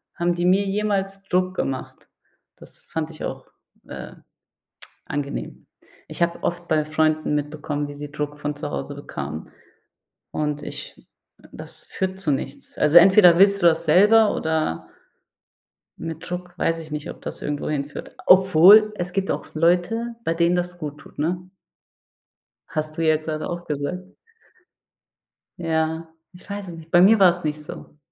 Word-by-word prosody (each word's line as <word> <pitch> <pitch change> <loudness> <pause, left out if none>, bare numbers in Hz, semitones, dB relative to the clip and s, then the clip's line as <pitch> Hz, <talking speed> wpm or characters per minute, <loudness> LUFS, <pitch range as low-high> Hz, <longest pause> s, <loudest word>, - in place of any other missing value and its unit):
haben 175 0 +1
die 175 - -1
mir 190 +3 +3
jemals 195 -1 -1
Druck 185 0 +1
gemacht. 135 -7 -4 0.5
Das - - -15
fand 160 -1 -3
ich 160 - -10
auch, 130 0 -5 0.4
äh, - - -8 0.9
angenehm. 145 -1 -5 0.4
Ich - - -5
habe 170 0 0
oft 175 0 -2
bei 155 -2 +2
Freunden 155 0 +1
mitbekommen, 145 0 -3
wie 145 - -8
sie 145 0 -8
Druck 150 0 -4
von 145 0 -3
zu 145 0 -5
Hause 145 - -5
bekamen, 75 - -7 0.8
und 150 -1 -2
ich - - -9 0.5
das - - -10
führt 190 0 -4
zu 155 -6 0
nichts. 135 +1 -5
Also 150 +2 +3
entweder 180 -1 +7
willst 200 0 +5
du - - +5
das 165 0 +3
selber 210 +7 +5
oder 160 - -2 1.1
mit 165 0 -7
Druck 180 0 -6
weiß 165 -1 0
ich 155 -1 -10
nicht, 150 0 -5
ob - - -9
das - - -7
irgendwo 145 0 -3
hinführt. 145 -1 -5
Obwohl, 190 +3 +7
es 180 -2 -4
gibt 195 0 -1
auch - - -4
Leute, 180 +9 +1
bei 165 - 0
denen 170 +1 +2
das 175 0 -3
gut 150 -3 -7
tut, - - -17
ne? 180 +4 -2 1.2
Hast 155 0 -4
du 165 - 0
ja 155 0 +4
gerade 155 0 -4
auch 175 0 -5
gesagt. 155 +7 -4 1.5
Ja, 160 -1 -1 0.3
ich 180 +3 -17
weiß 200 -1 -5
es 170 - -7
nicht. 165 0 -12
Bei 175 - +6
mir 210 +4 +6
war's 180 -2 +4
nicht 150 0 -3
so. 150 - -11
165 Hz, 160 wpm, -23 LUFS, 150-185 Hz, 1.5 s, entweder